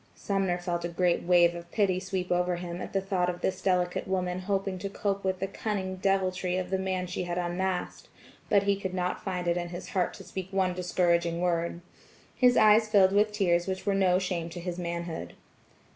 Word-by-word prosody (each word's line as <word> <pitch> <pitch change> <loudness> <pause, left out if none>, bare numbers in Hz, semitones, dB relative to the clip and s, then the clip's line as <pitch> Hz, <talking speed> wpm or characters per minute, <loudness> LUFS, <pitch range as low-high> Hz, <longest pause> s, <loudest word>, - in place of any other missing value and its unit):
Sumner 195 -3 0
felt 175 -1 -3
a - - 0
great 175 0 +1
wave 175 -1 +4
of 170 0 -9
pity 195 -4 +2
sweep 185 -1 -3
over 180 0 +2
him 175 0 -5
at - - -6
the 195 - 0
thought 185 -2 0
of 175 0 -5
this 185 -1 -1
delicate 180 -2 0
woman 185 -1 -1
hoping 195 0 -2
to 200 - -4
cope 200 0 -2
with 190 -1 -1
the 195 - 0
cunning 195 -1 -3
deviltry 185 -1 0
of 185 0 -3
the 190 - +1
man 185 -1 -1
she 180 0 -4
had 175 0 -3
unmasked; 180 +1 -2 0.4
but 200 -2 +4
he 200 0 +2
could 190 -2 -4
not 180 0 -2
find 180 -2 -3
it 170 0 +2
in 175 0 -3
his 175 +1 -7
heart 185 -3 0
to 195 - -10
speak 185 0 -6
one 190 -2 +1
discouraging 170 -2 +1
word. 170 -1 -1 0.5
His 250 -1 +4
eyes 215 +1 +6
filled 200 -3 +5
with 210 +2 +3
tears 175 -4 +1
which 190 0 -3
were 200 - +2
no 190 -2 +3
shame 180 -3 -2
to 175 +1 -7
his 175 0 -4
manhood. 170 -1 -4
185 Hz, 210 wpm, -28 LUFS, 175-195 Hz, 0.5 s, eyes